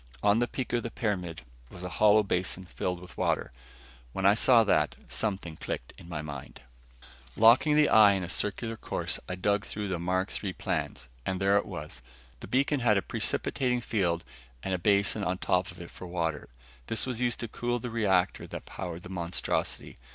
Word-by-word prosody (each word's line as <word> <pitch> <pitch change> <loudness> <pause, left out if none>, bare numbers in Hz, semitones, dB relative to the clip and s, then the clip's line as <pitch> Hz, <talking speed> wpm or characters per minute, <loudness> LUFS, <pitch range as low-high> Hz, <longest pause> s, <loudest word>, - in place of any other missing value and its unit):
On 105 +2 +4
the 120 - +2
peak 130 0 -4
of 120 - +2
the 115 - -4
pyramid 90 - -3 0.3
was 90 - -10
a 90 - -4
hollow 105 0 +7
basin 95 -1 -1
filled 90 +1 -3
with 90 0 -12
water. - - 0 0.6
When 95 - -2
I 100 - +7
saw 115 +1 +5
that, 105 - +2
something 95 -7 -3
clicked - - -5
in 85 - -13
my 80 -3 -4
mind. 70 -3 -8 0.7
Locking 120 +7 +6
the 150 0 +5
eye 105 -2 +7
in 95 -2 -1
a - - -4
circular 110 +5 -1
course, - - -2
I 90 - -2
dug 100 +2 +1
through 105 0 -4
the 90 -2 -2
Mark 95 +3 -1
III 95 -2 -2
plans - - -3 0.2
and 95 +5 -2
there 100 +1 +3
it 100 - +2
was. 65 - -7 0.4
The - - -9
beacon 140 +2 +2
had 110 -4 +3
a 100 - 0
precipitating 125 +6 0
field 90 -8 0 0.4
and 95 - -2
a 90 - 0
basin 100 +2 +3
on 90 -1 0
top 90 0 +1
of 90 - -11
it 85 - -9
for 90 - -9
water; 85 -3 -2 0.4
this 110 - +1
was 125 -2 -3
used 120 -1 +1
to 120 - -3
cool 120 +3 -2
the 120 0 -5
reactor 95 -5 +1
that - - -7
powered 90 -1 -6
the 90 - -9
monstrosity. 85 -7 -2
95 Hz, 195 wpm, -29 LUFS, 90-115 Hz, 0.7 s, hollow